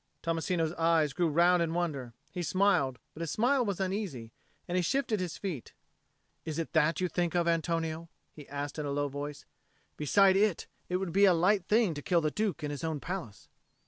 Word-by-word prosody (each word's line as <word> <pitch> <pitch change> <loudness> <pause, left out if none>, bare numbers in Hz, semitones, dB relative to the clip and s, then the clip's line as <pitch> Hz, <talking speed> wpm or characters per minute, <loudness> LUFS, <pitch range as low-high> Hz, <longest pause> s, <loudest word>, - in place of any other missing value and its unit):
Tommasino's 165 0 0
eyes 165 -3 +3
grew 175 +2 +1
round 175 +3 +4
in 165 0 -1
wonder: 140 -9 -2 0.2
he 180 - -4
smiled, 175 -7 +2 0.2
but 160 - -9
his 165 - -2
smile 250 - +2
was 200 -5 -2
uneasy, 185 - -3 0.4
and 175 - -2
he 185 - +3
shifted 225 +2 0
his 180 -3 -3
feet. 175 - -5 0.7
"Is 155 -1 -4
it 165 - -3
that 155 +2 +3
you 185 - +1
think 175 -1 -1
of, 170 -1 +2
Antonio?" 165 -1 -1 0.2
he 150 -3 -12
asked 145 +2 -4
in 150 - -2
a - - -2
low 145 0 0
voice. 145 +1 -6 0.5
"Beside 190 +6 +4
it, 200 -3 +2 0.2
it 180 - -1
would 190 -2 -3
be 200 +1 +6
a 185 -3 +5
light 185 +2 +3
thing 215 -5 +3
to 145 - -6
kill 175 -1 +2
the 155 -1 0
Duke 210 -5 -2
in 145 - -2
his 145 +2 -6
own 160 -2 -2
palace." 170 - -6
170 Hz, 205 wpm, -30 LUFS, 150-185 Hz, 0.7 s, be